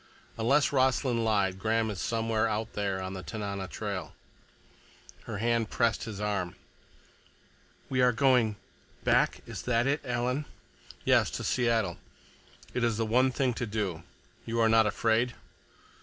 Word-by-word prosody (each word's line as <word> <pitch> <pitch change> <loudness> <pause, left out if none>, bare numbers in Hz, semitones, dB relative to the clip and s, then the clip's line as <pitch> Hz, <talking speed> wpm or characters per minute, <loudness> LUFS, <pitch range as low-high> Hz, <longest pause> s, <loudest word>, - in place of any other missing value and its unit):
Unless 135 +6 +3
Rossland 130 -3 +2
lied, 100 -4 +1
Graham 110 +1 +1
is 100 - -5
somewhere 115 -1 0
out 110 +1 -3
there 100 -2 -1
on 95 0 -4
the 95 - -5
Tanana 100 +3 -4
trail." 100 -4 -5 1.1
Her 110 -3 -5
hand 115 0 +1
pressed 115 -2 +1
his 110 -3 -6
arm. 100 -4 -2 1.3
"We 130 -1 +1
are 125 0 +5
going—back? 120 -4 +1
Is - - -6
that 120 -1 +1
it, 140 +3 +1
Alan?" 125 +3 -1 0.6
"Yes, - - +4
to - - -5
Seattle. 115 -8 +1 0.7
It 125 - -1
is 115 -3 +1
the 115 - 0
one 125 +4 +3
thing 130 0 0
to 120 +1 -3
do. 100 -6 -2 0.4
You 115 0 -2
are 115 -1 +4
not 110 -1 +5
afraid?" 115 +3 +1
115 Hz, 140 wpm, -29 LUFS, 105-120 Hz, 1.3 s, are